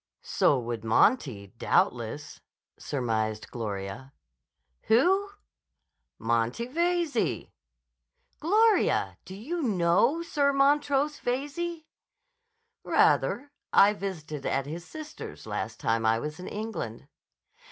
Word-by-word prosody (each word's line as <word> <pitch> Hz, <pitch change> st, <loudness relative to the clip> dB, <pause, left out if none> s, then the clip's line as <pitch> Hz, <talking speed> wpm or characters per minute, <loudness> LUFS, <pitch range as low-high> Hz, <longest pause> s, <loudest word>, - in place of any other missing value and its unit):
"So 140 Hz, -, +2 dB
would 120 Hz, -2 st, -4 dB
Monty, 115 Hz, -, +2 dB
doubtless," 125 Hz, +6 st, 0 dB, 0.3 s
surmised 110 Hz, -5 st, -2 dB
Gloria. 110 Hz, +3 st, -5 dB, 0.7 s
"Who?" 380 Hz, -, +4 dB, 0.9 s
"Monty 115 Hz, -, 0 dB
Veyze." 340 Hz, +3 st, 0 dB, 0.9 s
"Gloria! 425 Hz, +7 st, +3 dB
Do 190 Hz, -, -9 dB
you 310 Hz, -, -4 dB
know 205 Hz, -, +2 dB
Sir 285 Hz, -4 st, +1 dB
Montrose 285 Hz, +1 st, +2 dB
Veyze?" 295 Hz, +6 st, -3 dB, 1.0 s
"Rather. 285 Hz, +4 st, +2 dB, 0.2 s
I 205 Hz, +1 st, +6 dB
visited 160 Hz, -8 st, -5 dB
at 135 Hz, 0 st, 0 dB
his 165 Hz, +4 st, -6 dB
sister's 310 Hz, -1 st, -9 dB
last -, -, -4 dB
time 115 Hz, 0 st, 0 dB
I 110 Hz, 0 st, +3 dB
was 150 Hz, +6 st, -5 dB
in 180 Hz, -, -7 dB
England." 205 Hz, -, -5 dB
195 Hz, 95 wpm, -28 LUFS, -, 1.0 s, I